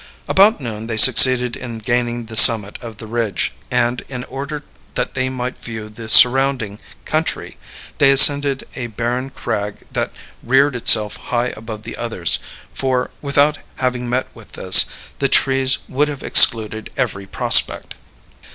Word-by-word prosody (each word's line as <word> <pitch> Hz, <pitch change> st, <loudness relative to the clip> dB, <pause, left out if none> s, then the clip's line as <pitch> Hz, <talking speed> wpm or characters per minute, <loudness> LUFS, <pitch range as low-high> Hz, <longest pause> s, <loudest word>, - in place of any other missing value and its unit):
About 200 Hz, +2 st, +2 dB
noon 115 Hz, -4 st, -9 dB
they 110 Hz, -2 st, -6 dB
succeeded 125 Hz, +2 st, +6 dB
in 120 Hz, -2 st, -10 dB
gaining 120 Hz, +1 st, -4 dB
the 110 Hz, 0 st, -12 dB
summit 110 Hz, -1 st, +6 dB
of 115 Hz, -3 st, -11 dB
the 110 Hz, -, -12 dB
ridge; 115 Hz, -2 st, -4 dB, 0.2 s
and, 125 Hz, 0 st, -3 dB
in 125 Hz, -2 st, -8 dB
order 140 Hz, +3 st, -9 dB, 0.3 s
that -, -, -5 dB
they 130 Hz, 0 st, -4 dB
might 130 Hz, 0 st, -8 dB
view 110 Hz, -2 st, -10 dB
the 110 Hz, +1 st, -12 dB
surrounding 125 Hz, -4 st, +3 dB, 0.3 s
country, 155 Hz, +1 st, -5 dB, 0.4 s
they 140 Hz, -, +3 dB
ascended 140 Hz, 0 st, +5 dB
a 120 Hz, -2 st, -7 dB
barren 120 Hz, +4 st, -6 dB
crag 105 Hz, -6 st, -6 dB, 0.2 s
that -, -, -5 dB, 0.3 s
reared 135 Hz, +2 st, 0 dB
itself 110 Hz, -3 st, +2 dB
high 125 Hz, 0 st, -5 dB
above 110 Hz, -1 st, -11 dB
the -, -, -10 dB
others; 110 Hz, -8 st, -1 dB, 0.3 s
for, 130 Hz, -2 st, -4 dB
without 145 Hz, +1 st, -1 dB, 0.2 s
having 125 Hz, -1 st, -5 dB
met 125 Hz, +2 st, -3 dB
with -, -, -19 dB
this, -, -, +5 dB, 0.3 s
the 135 Hz, -, -2 dB
trees 135 Hz, 0 st, +1 dB
would 145 Hz, +3 st, -2 dB
have 145 Hz, -2 st, -9 dB
excluded 110 Hz, -1 st, +3 dB
every 100 Hz, 0 st, -5 dB
prospect. -, -, +1 dB
125 Hz, 150 wpm, -16 LUFS, 110-135 Hz, 0.4 s, succeeded